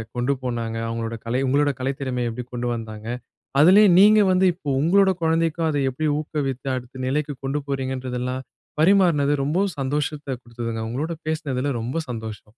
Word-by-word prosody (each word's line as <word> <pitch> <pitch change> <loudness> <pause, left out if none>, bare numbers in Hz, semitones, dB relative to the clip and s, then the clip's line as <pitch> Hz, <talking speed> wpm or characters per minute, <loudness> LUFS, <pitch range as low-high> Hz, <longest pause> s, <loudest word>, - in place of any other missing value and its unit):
கொண்டு 125 +3 +1
போனாங்க. 115 -2 -3
அவங்களோட 115 0 -3
கலை 120 +3 0
உங்களோட 145 +2 +3
கலைத்திறமையை 130 -2 -2
எப்டி 125 +2 -5
கொண்டு 120 0 -2
வந்தாங்க. 110 -1 -7 0.5
அதிலயே 195 +7 +7
நீங்க 215 +2 +7
வந்து 185 +1 +3
இப்போ 160 -4 -7
உங்களோட 190 +4 +4
குழந்தைக்கும் 165 0 +1
அத 145 - 0
எப்டி 155 +4 -2
ஊக்குவித்து 140 -3 -3
அடுத்த 130 +1 -7
நிலைக்கு 145 +2 -1
கொண்டு 140 +2 -1
போகிறீங்கன்றதெல்லாம், 130 -1 -3 0.4
பரிமாறுனது 170 -6 +4
ரொம்பவும் 180 +6 0
சந்தோஷத்த 145 -1 -2
குடுத்ததுங்க. 115 -1 -5
உங்களோட 155 +8 -3
பேசுனதுல 140 -4 -1
ரொம்ப 130 +8 -2
சந்தோஷம். 110 -2 -7
135 Hz, 145 wpm, -23 LUFS, 125-155 Hz, 0.5 s, அதிலயே